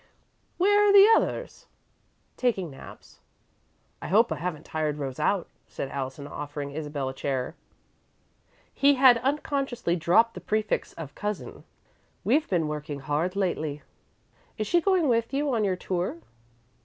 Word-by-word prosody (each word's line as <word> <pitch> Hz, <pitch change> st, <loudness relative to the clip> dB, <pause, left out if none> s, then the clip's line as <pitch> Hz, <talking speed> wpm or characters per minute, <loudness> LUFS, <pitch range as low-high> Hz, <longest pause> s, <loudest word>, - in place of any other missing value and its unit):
"Where 410 Hz, +3 st, +4 dB
are -, -, +6 dB
the 400 Hz, 0 st, +9 dB
others?" -, -, -2 dB, 0.7 s
"Taking 195 Hz, -, -1 dB
naps." 135 Hz, -, -13 dB, 0.8 s
"I -, -, -5 dB
hope 225 Hz, +5 st, +4 dB
I -, -, -1 dB
haven't 170 Hz, -3 st, -4 dB
tired 155 Hz, -2 st, -2 dB
Rose 135 Hz, -3 st, -5 dB
out," 195 Hz, -3 st, +1 dB, 0.2 s
said 135 Hz, -, -5 dB
Allison, 135 Hz, +1 st, -5 dB
offering 145 Hz, 0 st, -6 dB
Isabel 145 Hz, -2 st, -4 dB
a -, -, -6 dB
chair. 130 Hz, 0 st, -3 dB, 1.2 s
He 285 Hz, 0 st, +4 dB
had 255 Hz, -3 st, +6 dB
unconsciously 270 Hz, -, -1 dB
dropped 180 Hz, +7 st, +3 dB
the -, -, -9 dB
prefix 215 Hz, 0 st, -1 dB
of 150 Hz, -4 st, -8 dB
"Cousin." 210 Hz, -1 st, -5 dB, 0.6 s
"We've 305 Hz, +1 st, +2 dB
been 170 Hz, -5 st, +1 dB
working 150 Hz, -2 st, -5 dB
hard 155 Hz, +6 st, -1 dB
lately." 155 Hz, -7 st, -2 dB, 0.7 s
"Is 215 Hz, -, -1 dB
she 345 Hz, +9 st, +2 dB
going 370 Hz, -4 st, +2 dB
with 230 Hz, +1 st, +1 dB
you 285 Hz, -1 st, 0 dB
on 225 Hz, -2 st, +1 dB
your 190 Hz, -2 st, +1 dB
tour?" 180 Hz, -1 st, -3 dB
185 Hz, 145 wpm, -27 LUFS, -, 1.2 s, the